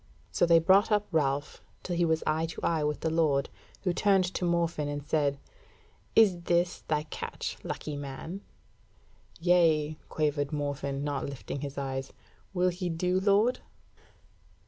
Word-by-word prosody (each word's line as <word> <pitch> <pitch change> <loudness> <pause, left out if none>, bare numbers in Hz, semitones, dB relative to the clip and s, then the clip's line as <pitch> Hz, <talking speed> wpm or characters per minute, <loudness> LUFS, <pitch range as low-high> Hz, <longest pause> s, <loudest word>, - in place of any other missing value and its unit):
So 175 - +2
they 170 0 +7
brought 190 +6 +4
up 210 0 +3
Ralph, 145 -3 0 0.2
till 175 - -3
he 170 0 +2
was 160 -1 +1
eye 160 +1 +1
to 160 - -8
eye 160 -2 +1
with 150 0 -1
the 160 - 0
Lord, 150 -4 +2 0.3
who 180 -3 +1
turned 195 0 +3
to 180 - -1
Morfinn 170 -3 0
and 145 -1 -4
said: 145 -2 +1 0.8
"Is 195 -6 +5
this 175 +1 +1
thy 150 -1 +1
catch, 155 - -5
lucky 150 - -4
man?" 145 +7 -6 1.0
"Yea," 160 -3 +3
quavered 145 -2 0
Morfinn, 140 -2 -2
not 145 -2 -2
lifting 140 0 -6
his 140 -1 -6
eyes; 135 -1 -4 0.4
"Will 180 -1 +2
he 180 0 -3
do, 180 +3 0
lord?" 205 +5 +3
160 Hz, 150 wpm, -29 LUFS, 145-180 Hz, 1.0 s, they